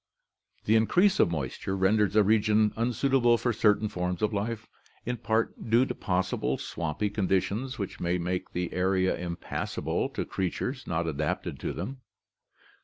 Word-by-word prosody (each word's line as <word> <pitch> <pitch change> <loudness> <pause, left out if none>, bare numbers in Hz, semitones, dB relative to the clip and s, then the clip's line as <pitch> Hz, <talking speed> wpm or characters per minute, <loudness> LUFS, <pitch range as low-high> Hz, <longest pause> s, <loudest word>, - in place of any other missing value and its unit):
The 110 - +4
increase 175 - +4
of - - +5
moisture 80 +5 -3
renders 105 +2 +2
a 105 - +6
region 105 0 +3
unsuitable 120 +1 +2
for 120 0 0
certain 105 0 +3
forms 90 -1 -3
of 105 +1 +1
life, 110 +2 -3 0.4
in 125 +1 -2
part 115 +1 -1
due 120 +3 +5
to 130 - -3
possible 90 - -1
swampy 85 +5 -3
conditions 105 +6 0
which 100 -2 -5
may 85 +1 0
make 90 +1 -2
the 90 0 -3
area 95 0 +2
impassable 85 -1 -3
to - - -4
creatures 125 +8 -3
not 85 0 -1
adapted 75 -1 -2
to - - -3
them. 130 0 -6
105 Hz, 150 wpm, -28 LUFS, 90-115 Hz, 0.4 s, a